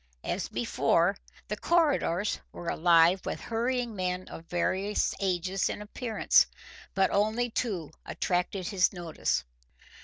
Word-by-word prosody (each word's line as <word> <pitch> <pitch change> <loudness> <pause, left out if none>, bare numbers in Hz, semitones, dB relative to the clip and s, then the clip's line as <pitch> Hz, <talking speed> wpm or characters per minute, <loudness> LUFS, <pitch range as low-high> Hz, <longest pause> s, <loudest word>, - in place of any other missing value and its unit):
As - - -2
before, - - +2 0.3
the 210 - -2
corridors 270 - +1
were 175 - -5
alive 170 +2 +5
with - - -4
hurrying 240 0 -1
men 185 -1 -2
of 165 - -9
various 190 +4 0
ages 190 0 0
and - - -4
appearance, 220 +2 +2 0.5
but 195 0 +3
only 220 +4 +1
two 190 - -2
attracted 180 0 -1
his 190 -3 +3
notice. 175 - -2
195 Hz, 120 wpm, -29 LUFS, 180-220 Hz, 0.5 s, alive